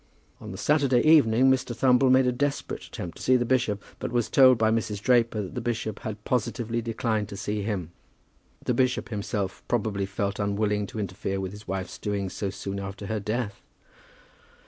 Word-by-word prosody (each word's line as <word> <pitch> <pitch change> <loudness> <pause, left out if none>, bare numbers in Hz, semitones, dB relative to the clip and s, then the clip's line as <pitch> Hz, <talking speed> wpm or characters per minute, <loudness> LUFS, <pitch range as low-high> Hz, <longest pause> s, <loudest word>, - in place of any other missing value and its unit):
On - - -9
the - - -7
Saturday 140 -5 +3
evening 130 -5 +6
Mr. 125 -2 0
Thumble 130 +2 +4
made 130 0 +5
a 125 - +3
desperate 140 +3 -2
attempt 85 -2 -7
to - - -9
see 130 - +4
the 120 -1 +2
bishop, 120 -5 +1 0.2
but - - -4
was 120 -2 0
told 130 -2 +7
by 110 0 +3
Mrs. 110 -2 -1
Draper 115 -2 +2
that 95 - -8
the 125 - -3
bishop 110 -3 -3
had 105 -1 -6
positively 120 -1 -1
declined 110 -2 -1
to 100 - -7
see 105 +1 -2
him. 100 -6 -3 0.7
The 125 - +1
bishop 125 -1 +1
himself 100 -3 -3
probably 105 -4 0
felt 100 +1 -2
unwilling 105 0 0
to 110 - -7
interfere 95 0 -3
with 95 -1 -3
his 105 +1 -12
wife's 95 0 -4
doings 100 -2 -2
so 100 - -2
soon 100 0 -5
after 100 +1 -6
her 110 +1 -2
death! 105 0 -3
110 Hz, 190 wpm, -26 LUFS, 100-125 Hz, 0.7 s, told